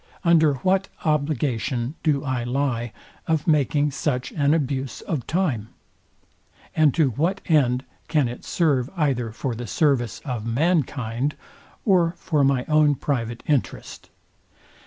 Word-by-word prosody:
Under 160 -4 +4
what 190 +1 +2 0.2
obligation 140 -4 0
do 150 -3 +1
I 130 -3 -1
lie 120 -2 -1 0.4
of 160 -3 +1
making 150 -1 +2
such 135 -2 -2
an 145 -2 +1
abuse 135 -5 -1
of 140 -8 -4
time? 145 - -1 1.1
And 155 -2 +5
to 150 -6 +3
what 170 - 0
end 130 -5 +2 0.2
can 155 -4 +2
it 120 +1 -7
serve 140 -7 +1
either 130 -7 0
for 125 +3 -3
the 120 +1 -6
service 120 - +1
of 125 -6 -3
mankind, 135 -1 0 0.5
or 180 -5 +3
for 155 -5 0
my 135 -2 +2
own 150 -1 +4
private 120 -4 -3
interest? 145 -4 -2
140 Hz, 130 wpm, -23 LUFS, 125-155 Hz, 1.1 s, And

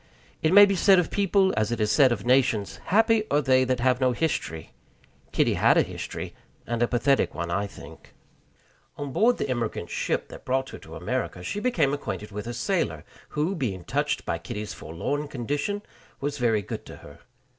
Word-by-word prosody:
It 155 - +2
may 205 +2 +10
be 200 -1 0
said 190 +1 +5
of 180 - +1
people, 195 -1 +2
as 110 +1 0
it 120 - -2
is 105 0 +1
said 135 -4 +5
of 120 - -2
nations, 125 -6 +2
"Happy 225 +3 +3
are 145 - +3
they 130 -2 +3
that 130 -1 0
have 130 0 +2
no 130 -1 +3
history." 120 - -2 0.6
Kitty - - +2
had - - +4
a - - +5
history, - - -6 0.3
and 120 0 -2
a 120 - +4
pathetic 135 +3 +1
one, 85 0 -3
I 100 +3 0
think. - - -14 0.8
On 145 -1 -5
board 235 - +3
the - - -2
emigrant 120 -4 -3
ship - - -1
that - - -11
brought 130 +1 -1
her - - -9
to - - -11
America, 90 - -3
she 205 - -3
became 175 - +1
acquainted 110 -7 -5
with 105 +3 -6
a 120 - -4
sailor, - - -1 0.3
who, 155 +6 +1
being 110 - -3
touched 145 +8 -1
by 85 - -2
Kitty's 105 +3 -6
forlorn 140 - -4
condition, 145 - -3 0.4
was 145 0 -3
very 115 -4 +2
good - - -6
to - - -9
her. - - -13
130 Hz, 195 wpm, -26 LUFS, 115-155 Hz, 0.8 s, may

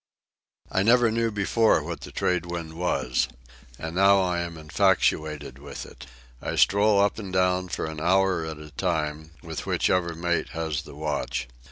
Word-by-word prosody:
I 95 - +2
never 115 +2 +5
knew 115 0 +1
before 110 +2 +2
what - - -5
the - - -9
trade 90 -1 0
wind 85 -2 -5
was. 90 +2 0 0.5
And 80 0 -5
now 100 +1 +6
I 90 -2 0
am 85 -1 -4
infatuated 75 -4 +1
with 70 +1 -8
it. - - -13 0.3
I - - -3
stroll 100 +1 +4
up 100 +2 +2
and 100 -4 -6
down 90 0 +1
for - - -3
an 80 -1 -6
hour 95 0 +3
at 80 -1 -5
a 75 0 -11
time, 75 +2 -2
with - - -6
whichever 85 -2 +1
mate 85 +1 -1
has 80 -3 -2
the 70 - -12
watch. 75 -1 -2
85 Hz, 170 wpm, -26 LUFS, 80-95 Hz, 0.5 s, now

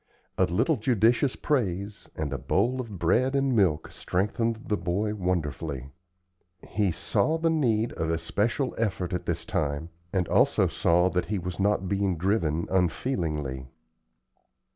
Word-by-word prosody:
A - - +3
little 115 - +1
judicious 120 +3 +2
praise 100 -7 -2
and 75 -3 -3
a 70 - -3
bowl 120 - +1
of 110 -6 -8
bread 130 +11 +2
and 135 -2 +2
milk 85 -8 +2
strengthened 110 +5 -1
the 105 - 0
boy 100 +4 -1
wonderfully. 80 -8 -2 0.8
He 100 -1 +1
saw 155 - +1
the 165 0 +1
need 120 -8 +1
of 80 -1 -2
especial 105 - 0
effort 95 -5 -1
at 90 - -3
this - - -2
time, 75 +2 -2 0.2
and 90 -3 0
also - - +3
saw 90 +2 +2
that 90 - -1
he 105 - -1
was 90 -1 -5
not 100 -1 +1
being 100 -2 0
driven 85 -3 +1
unfeelingly. 80 - -1
95 Hz, 140 wpm, -27 LUFS, 85-115 Hz, 0.8 s, A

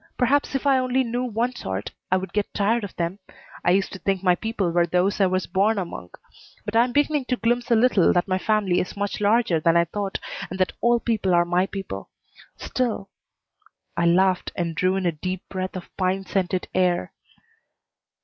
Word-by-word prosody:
Perhaps 275 +2 +2
if 270 - -2
I 270 -2 +4
only 255 +1 +1
knew 245 +1 -2
one 240 +1 -1
sort 95 - -5 0.2
I 185 - +4
would 190 -1 -6
get 210 -1 -1
tired 220 +3 +1
of 205 - -7
them. 170 +3 -3 0.4
I - - +2
used 195 +2 +2
to 190 - -7
think 195 -1 -1
my 180 -2 +5
people 205 -2 -2
were 170 0 +2
those 180 +4 +1
I 190 - +5
was 185 0 0
born 200 +5 +1
among, 170 - -5 0.6
but 210 - -4
I'm 240 +2 +4
beginning 290 +1 +1
to 250 - 0
glimpse 240 +1 0
a 235 - +5
little 220 -5 +4
that 175 +1 +1
my 185 -1 0
family 205 -4 +1
is 185 - -4
much 205 0 -3
larger 210 -4 +3
than 165 +2 +3
I 170 - +4
thought, 195 +3 -3 0.3
and 185 - -6
that 185 - +1
all 235 0 +3
people 210 -6 +1
are 175 0 +4
my 180 +2 +1
people. 195 -1 -6 0.5
Still 235 -6 -2 0.4
" 435 +2 -36
I 170 - +2
laughed 185 +2 +2
and 170 -2 -2
drew 185 +3 +1
in 190 -1 -1
a 175 - +3
deep 185 +4 -5
breath 185 0 -4
of 185 - -9
pine 190 +1 0
scented 185 -1 -1
air. 180 - +1
195 Hz, 205 wpm, -24 LUFS, 180-230 Hz, 0.6 s, my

